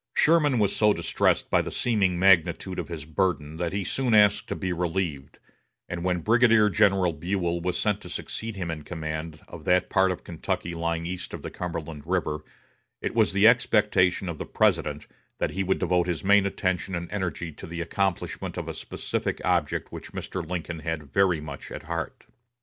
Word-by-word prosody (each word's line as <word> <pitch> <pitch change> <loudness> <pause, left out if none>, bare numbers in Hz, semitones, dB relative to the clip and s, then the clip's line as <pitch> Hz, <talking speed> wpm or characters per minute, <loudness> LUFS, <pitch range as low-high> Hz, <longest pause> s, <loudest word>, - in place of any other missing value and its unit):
Sherman 150 -4 +4
was 105 -3 +2
so 105 -1 +4
distressed - - +1
by - - +4
the - - -5
seeming 100 -7 +1
magnitude 90 0 +3
of - - -4
his 80 -4 -6
burden 80 -2 -1
that 85 0 -2
he 100 +1 -2
soon 125 +3 +1
asked 105 -1 +5
to - - -3
be 95 -2 -2
relieved; 85 -5 -2 0.5
and 85 -1 -4
when 90 -1 0
Brigadier 115 +1 +5
General 95 -2 +3
Buell 85 +1 -1
was 90 0 -1
sent 105 -1 0
to 90 - -9
succeed 110 +4 -5
him 90 -4 -3
in 80 -2 -5
command 80 -1 -5
of 85 -3 -10
that 90 0 +2
part 95 -1 +4
of 90 - -5
Kentucky 85 0 -3
lying 85 0 -2
east 90 +1 -5
of - - -10
the - - -5
Cumberland 85 -3 -5
River, 85 -4 0 0.6
it - - -3
was 110 -3 +3
the 100 +2 +5
expectation 105 -6 +3
of 85 -3 -4
the - - -4
President - - +1 0.3
that - - -1
he 95 - -1
would 95 0 +1
devote 90 -1 +1
his 85 -4 -2
main 100 0 +5
attention 95 -1 -1
and 85 0 -4
energy 85 -4 -3
to - - -10
the 85 +1 -6
accomplishment 95 +1 -2
of - - -4
a - - -3
specific - - -3
object - - 0
which - - -9
Mr. 95 - -4
Lincoln 85 0 -4
had 80 -3 -5
very 95 -4 +3
much 70 -2 -8
at - - -7
heart. 85 0 -4
90 Hz, 190 wpm, -26 LUFS, 85-100 Hz, 0.6 s, asked